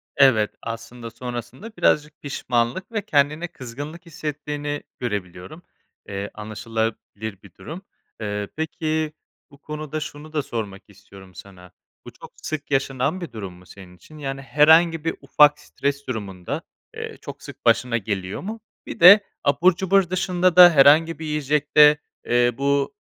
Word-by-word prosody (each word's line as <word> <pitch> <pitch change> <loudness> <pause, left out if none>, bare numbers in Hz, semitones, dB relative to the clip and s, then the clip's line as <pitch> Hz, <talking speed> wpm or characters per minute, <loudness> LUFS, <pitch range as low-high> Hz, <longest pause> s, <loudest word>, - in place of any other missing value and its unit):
Evet, 125 -7 +4
aslında 115 +1 -7
sonrasında 125 - -7
birazcık 150 0 +1
pişmanlık 125 - -2
ve 220 -2 -1
kendine 150 +2 +1
kızgınlık 150 +3 -9
hissettiğini 150 -2 -5 0.2
görebiliyorum. 105 - -5 0.4
Eee, 100 0 -5
anlaşılabilir 110 -1 -5
bir 95 -3 -16
durum. 170 +5 -9 0.4
Eee, 105 -1 -3
peki, 155 0 -2 0.4
bu 140 - -16
konuda 155 +1 -6
şunu 150 +1 -8
da 150 - +1
sormak 100 -4 -5
istiyorum 95 -2 -16
sana, 90 -2 -13 0.3
bu - - -9
çok - - -14
sık 150 -2 -5
yaşanan 135 +5 0
bir 170 - -6
durum 100 -5 -7
mu, 90 +1 -17
senin 90 -1 -14
için? 155 +12 -16
Yani, 135 -2 -5
herhangi 160 +5 +4
bir 165 - -1
ufak 150 +1 +5
stres 140 -1 -4
durumunda, 100 -7 -5 0.3
eee, - - -7
çok - - -9
sık - - -12
başına 125 -2 +3
geliyor 95 -3 -4
mu? 220 +4 -6 0.3
Bir - - -8
de 200 +5 +9 0.2
abur 170 +5 +3
cubur 190 0 +2
dışında 185 -1 +1
da 180 -1 +11
herhangi 155 +3 +5
bir 160 - -6
yiyecekte, 150 0 +4 0.3
eee, 120 0 +3
bu 140 +6 0
140 Hz, 145 wpm, -23 LUFS, 110-155 Hz, 0.4 s, da